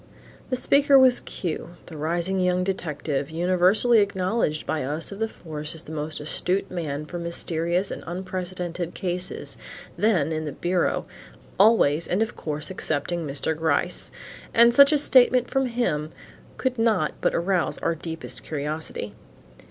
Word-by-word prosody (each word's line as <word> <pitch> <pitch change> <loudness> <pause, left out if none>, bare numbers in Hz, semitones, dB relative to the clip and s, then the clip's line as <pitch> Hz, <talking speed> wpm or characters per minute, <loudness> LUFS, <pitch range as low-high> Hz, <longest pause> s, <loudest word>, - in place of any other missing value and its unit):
The 255 - +1
speaker 280 +2 +4
was 260 -2 +6
Q, 175 0 -5
the 165 - -11
rising 170 +5 -1
young 180 0 +2
detective, 150 -6 -2
universally 185 +7 +3
acknowledged 190 -4 0
by 155 - -1
us 150 +7 -3
of 200 - -8
the 225 - +1
force 155 -5 -7
as 160 - -5
the 155 - -11
most 155 0 -4
astute 180 +5 -1
man 150 -4 -3
for 175 +3 -6
mysterious 170 +2 -1
and - - -6
unprecedented 180 -1 -4
cases, 180 0 -4 0.4
then 180 -8 +2
in 155 0 -2
the 150 - -4
bureau, 180 +1 0 0.5
always 180 -8 +4
and 195 +5 +2
of 225 - -6
course 150 +1 -4
excepting 165 -1 -2
Mr. 145 +3 -2
Gryce; 160 +2 0 0.5
and 235 +1 +7
such 280 +3 +7
a 300 - +4
statement 255 -3 +4
from 270 -1 +1
him 165 -11 -1 0.5
could 255 -2 -1
not 215 -9 +2
but - - +1
arouse 180 0 0
our 165 - 0
deepest 165 0 -6
curiosity. 150 -8 -4
175 Hz, 150 wpm, -25 LUFS, 155-200 Hz, 0.5 s, and